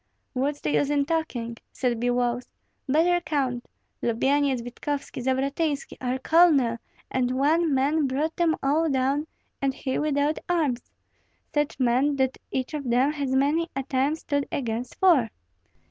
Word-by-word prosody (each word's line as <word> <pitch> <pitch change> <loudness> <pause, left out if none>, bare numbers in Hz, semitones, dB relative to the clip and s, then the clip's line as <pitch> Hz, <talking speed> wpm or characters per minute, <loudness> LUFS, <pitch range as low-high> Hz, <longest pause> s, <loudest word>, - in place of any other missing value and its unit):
"What's 280 +3 -1
the - - -1
use 285 - +2
in 285 -1 +2
talking?" 250 -8 -2
said 245 -3 -1
Biloüs, 245 0 0 0.4
"better 345 +5 +3
count: 275 -6 -2 0.3
Lyubyenyets, 265 +2 +1
Vitkovski, 275 +3 -4
Zavratynski, 275 +3 -1
our 255 0 -1
colonel; 275 -6 +4 0.3
and 255 0 0
one 315 +4 +3
man 280 +2 +2
brought 295 +5 -1
them 335 -2 +2
all 310 +4 +2
down, 275 +3 +1 0.3
and 270 -1 0
he 260 - -2
without 295 0 +1
arms, 295 -9 0 0.6
such 295 -1 0
men 260 +3 +2
that 265 -1 0
each 260 +1 -3
of 285 -4 -3
them 255 +4 +3
has 280 -3 -2
many 300 +5 +2
a 275 - -1
time 270 +3 +1
stood 285 -3 -2
against 240 -1 -3
four. 320 -12 +4
275 Hz, 145 wpm, -26 LUFS, 255-300 Hz, 0.6 s, colonel